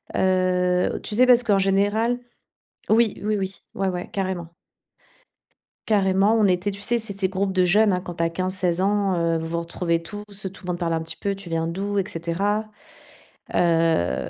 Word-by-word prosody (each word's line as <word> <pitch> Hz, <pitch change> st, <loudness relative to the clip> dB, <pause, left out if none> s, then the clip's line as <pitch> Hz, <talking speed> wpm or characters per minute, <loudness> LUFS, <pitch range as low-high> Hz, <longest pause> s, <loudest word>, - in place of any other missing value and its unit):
Heu, 180 Hz, -1 st, +1 dB
tu 210 Hz, -, -4 dB
sais, 255 Hz, +2 st, +5 dB
parce 245 Hz, -1 st, +6 dB
qu'en 205 Hz, -4 st, +3 dB
général 205 Hz, +5 st, +1 dB, 0.7 s
oui, 225 Hz, 0 st, +3 dB
oui, 210 Hz, 0 st, 0 dB
oui. 190 Hz, -2 st, -4 dB
Ouais, 195 Hz, 0 st, -1 dB
ouais. 180 Hz, -1 st, -5 dB
Carrément 185 Hz, -4 st, -3 dB, 1.4 s
carrément, 200 Hz, 0 st, +3 dB
on 215 Hz, -2 st, +4 dB
était 185 Hz, +3 st, +1 dB
tu 200 Hz, -, -9 dB
sais, 240 Hz, +3 st, +1 dB
c'est 205 Hz, -3 st, -6 dB
ces 190 Hz, -1 st, +1 dB
groupe 190 Hz, +1 st, -1 dB
de 185 Hz, -1 st, +2 dB
jeunes, 205 Hz, +3 st, +4 dB
hein, 180 Hz, -, 0 dB
quand 175 Hz, -1 st, -7 dB
tu 165 Hz, -, 0 dB
as -, -, +2 dB
15-16 185 Hz, 0 st, -1 dB
ans, 200 Hz, -1 st, +1 dB
heu, 165 Hz, -1 st, +1 dB
vous 160 Hz, -, -4 dB
vous 170 Hz, +1 st, -2 dB
retrouvez 170 Hz, 0 st, -1 dB
tous, 205 Hz, +5 st, -8 dB
tout 195 Hz, -2 st, -7 dB
le -, -, -8 dB
monde 175 Hz, -, -4 dB
parle 170 Hz, -2 st, -1 dB
un 165 Hz, -, 0 dB
petit 160 Hz, 0 st, -5 dB
peu, 200 Hz, +3 st, -2 dB
tu 195 Hz, -3 st, -9 dB
viens 165 Hz, 0 st, -1 dB
d'où? 200 Hz, +4 st, -2 dB
Et 190 Hz, -, -4 dB
cetera. 195 Hz, +6 st, -1 dB, 0.9 s
Heu 165 Hz, -, +2 dB
190 Hz, 195 wpm, -23 LUFS, 170-205 Hz, 1.4 s, parce